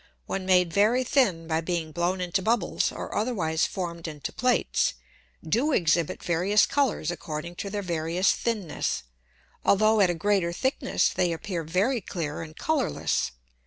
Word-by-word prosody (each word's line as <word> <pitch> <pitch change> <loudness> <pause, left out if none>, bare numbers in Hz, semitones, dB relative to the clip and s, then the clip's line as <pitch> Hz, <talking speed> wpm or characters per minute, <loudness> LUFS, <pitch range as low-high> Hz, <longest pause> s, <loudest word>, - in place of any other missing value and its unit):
when 190 -1 -4
made 180 -3 +4
very 220 +6 +3
thin 215 -11 +2
by 160 0 0
being 165 -2 -2
blown 175 +4 0
into 180 +2 0
Bubbles, 220 -2 +1
or - - -6
otherwise 180 -9 0
formed 170 -3 -5
into 150 -2 -6
Plates, 250 0 +1 0.5
do 255 - +2
exhibit 165 - +1
various 185 +5 +3
Colours 265 - 0
according 165 0 -5
to 200 - -4
their 205 0 -3
various 170 +2 +1
thinness, 210 - -2 0.6
altho' 215 +2 +4
at 185 - +5
a 175 - 0
greater 190 0 +1
thickness 260 +10 +1
they 180 -2 0
appear 170 0 -3
very 200 - +1
clear 165 -5 -4
and 155 -1 -9
colourless. 310 -5 0
180 Hz, 150 wpm, -26 LUFS, 165-210 Hz, 0.6 s, at